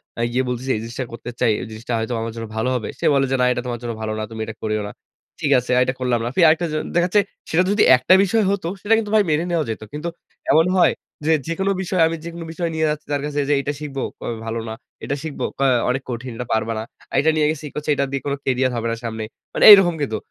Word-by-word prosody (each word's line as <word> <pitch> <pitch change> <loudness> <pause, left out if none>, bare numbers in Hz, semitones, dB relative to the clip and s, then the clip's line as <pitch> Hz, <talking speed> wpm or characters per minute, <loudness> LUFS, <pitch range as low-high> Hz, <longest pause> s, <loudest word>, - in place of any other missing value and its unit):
অ্যা 115 - -2
গিয়ে 130 +2 +1
বলতেছি 125 +2 -4
যে। - - +3
"এই 105 - -5
জিনিসটা 120 +3 -5
করতে 115 +1 -7
চাই। 115 - +3
এই - - -6
জিনিসটা 115 +2 -5
হয়তো 110 +2 -3
আমার 115 0 -3
জন্য 115 -1 -5
ভালো 110 +3 0
হবে।" 115 -4 -3
সে - - -2
বলে 135 -1 +3
যে, - - +3
"না - - +4
এটা 125 - -1
তোমার 120 -1 -3
জন্য 120 -1 -3
ভালো 110 0 -2
না। - - -2
তুমি 110 - -6
এটা 110 0 -7
করিও 110 -1 -1
না।" - - -7 0.5
ঠিক 145 - 0
আছে। 125 - -5
আর 125 - +5
এটা 130 - -2
করলাম 125 -2 +1
না। - - -1
ফি - - -1
আরেকটা 160 +2 +3
জি - - -3 0.2
দেখা 175 0 +3
যাচ্ছে, 205 +3 +4 0.3
সেটা 175 +3 +3
যদি 205 - +3
একটা 130 +9 +3
বিষয় 215 +3 +2
হতো, 200 -4 -2
সেটা 215 +2 +2
কিন্তু 215 -2 -2
ভাই 215 - +5
মেনে 155 +2 +1
নেওয়া 170 -2 +1
যাইত। 110 - -4
কিন্তু 150 +3 -3 0.4
এমন 160 +1 +5
হয় 180 - +5 0.3
যে 160 - +3 0.2
যেকোনো 190 +4 0
বিষয় 185 -1 0
আমি 165 - -2
যেকোনো 170 0 -7
বিষয় 170 +1 -2
নিয়ে 160 0 +1
যাচ্ছি 150 0 -3
তার 140 - 0
কাছে 145 0 -2
যে - - +4
এইটা 145 +1 -2
শিখব 145 -2 -7 0.2
কবে, 120 - -4
"ভালো 115 +1 -3
না।" - - -4 0.3
এটা 140 - -2
শিখব, 160 -3 -6 0.2
কয়, 135 -2 +4 0.2
"অনেক 130 +2 0
কঠিন। 125 +1 -5
এটা 125 - -5
পারবা 110 +1 0
না।" - - -3 0.3
আরেকটা 150 +4 +3
নিয়ে 155 -1 +3
গেছি 155 -1 -6
কচ্ছে, 150 0 -4
"এইটা 140 0 0
দিয়ে 135 - -2
কোনো 140 -1 0
কেরিয়ার 130 0 +1
হবে 115 0 -2
না - - -1
সামনে।" 110 -1 -4 0.3
মানে - - 0
এইরকম 195 -4 +8
কিন্তু। 110 -7 -1
135 Hz, 270 wpm, -21 LUFS, 115-160 Hz, 0.5 s, এইরকম